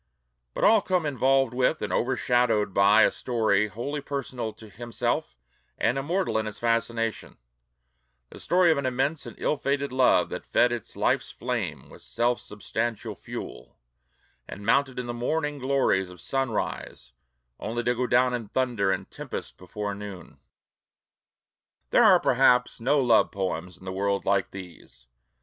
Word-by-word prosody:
But - - -2
all 220 -2 +6
come 180 -4 0
involved 135 -2 +2
with 130 +5 +1
and - - -2
overshadowed 120 -4 +1
by 100 +3 +6
a - - +4
story 110 -4 +1
wholly 120 +9 -4
personal 130 -5 -4
to 110 - -13
himself 120 - -3 0.4
and - - +1
immortal 160 0 0
in 110 - -3
its 105 -1 -6
fascination: 115 -1 -1 0.9
the - - -11
story 180 -1 +3
of 155 - +1
an 135 - -1
immense 135 +5 -1
and - - -10
ill 150 - 0
fated 140 0 -1
love 130 -1 +3
that - - -5
"fed 120 - +3
its 120 -3 -5
life's - - 0
flame - - -4
with - - -14
self 120 -1 0
substantial 110 +2 -4
fuel," - - -9 0.7
and 100 - -9
mounted 135 +3 +2
in 125 - -3
the 120 - -4
morning 145 +4 -2
glories 130 -8 +1
of 90 -1 -13
sunrise 115 - -3 0.5
only 120 +2 -3
to 120 - +2
go 125 +1 -1
down 125 +1 +3
in 120 -3 -3
thunder 115 -5 0
and - - -3
tempest - - -7
before 100 +3 -5
noon. 100 -3 -9 1.5
There - - +5
are - - +7
perhaps 125 -1 +3
no 135 +5 +2
love 120 -4 +4
poems 90 -2 -4
in 95 - -16
the 95 - -4
world 100 +1 -1
like 100 -1 +1
these. 90 -9 -12
120 Hz, 155 wpm, -26 LUFS, 105-135 Hz, 1.5 s, are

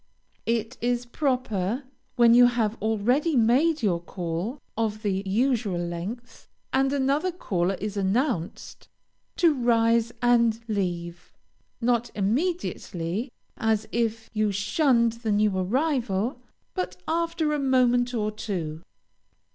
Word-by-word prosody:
It 230 -1 -1
is 245 +1 0
proper, 250 -4 -1 0.3
when 235 -2 +6
you 245 +1 +8
have 230 -3 0
already 245 +9 +1
made 260 +6 +3
your 180 -5 +2
call 175 - -4 0.2
of 215 -1 -2
the 195 -2 0
usual 220 -2 +1
length, 175 +8 -6 0.3
and 270 +1 +2
another 285 +6 +1
caller 195 - -1
is 210 +2 -5
announced, 200 - -2 0.5
to 335 -3 +4
rise 235 -2 +2
and 235 -2 +3
leave, 175 -5 -3 0.5
not 240 0 +1
immediately, 220 - -2 0.3
as 220 -1 0
if 225 -1 -1
you 215 -1 +1
shunned 235 - +2
the 220 -3 -1
new 205 -1 +2
arrival, 240 - 0 0.3
but 180 0 -3
after 330 -1 0
a 295 - 0
moment 250 -2 +2
or 215 -1 0
two. 170 -7 -4
230 Hz, 115 wpm, -26 LUFS, 200-255 Hz, 0.5 s, you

